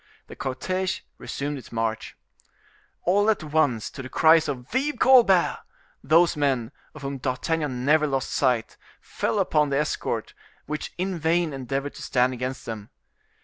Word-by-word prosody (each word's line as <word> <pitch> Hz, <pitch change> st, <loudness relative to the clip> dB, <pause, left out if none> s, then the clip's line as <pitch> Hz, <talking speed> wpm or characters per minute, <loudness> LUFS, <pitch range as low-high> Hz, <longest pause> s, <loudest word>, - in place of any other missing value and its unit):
The -, -, -11 dB
cortege 185 Hz, +8 st, -2 dB, 0.2 s
resumed 145 Hz, 0 st, -4 dB
its -, -, -14 dB
march. 115 Hz, -1 st, -3 dB, 0.9 s
All 205 Hz, +4 st, +3 dB
at 215 Hz, -7 st, +1 dB
once, 145 Hz, -7 st, 0 dB
to 130 Hz, -2 st, -8 dB
cries 160 Hz, +2 st, +5 dB
of 125 Hz, -3 st, -5 dB
"Vive 275 Hz, +2 st, 0 dB
Colbert!" 230 Hz, -9 st, +5 dB, 0.4 s
those 165 Hz, +4 st, +4 dB
men, 135 Hz, -6 st, 0 dB, 0.2 s
of 155 Hz, -, -10 dB
whom 135 Hz, 0 st, -4 dB
D'Artagnan 130 Hz, 0 st, -2 dB
never 150 Hz, +1 st, +4 dB
lost 135 Hz, -2 st, -2 dB
sight, 125 Hz, -4 st, 0 dB, 0.2 s
fell -, -, -2 dB
upon 155 Hz, -7 st, +2 dB
the 140 Hz, -, +1 dB
escort, 150 Hz, +1 st, -2 dB, 0.3 s
which 150 Hz, +1 st, -4 dB
in 185 Hz, -1 st, -2 dB
vain 165 Hz, 0 st, +1 dB
endeavored 135 Hz, +2 st, -3 dB
to -, -, -10 dB
stand 125 Hz, 0 st, +1 dB
against 130 Hz, +1 st, -5 dB
them. 110 Hz, -3 st, -6 dB
145 Hz, 145 wpm, -25 LUFS, 130-170 Hz, 0.9 s, cries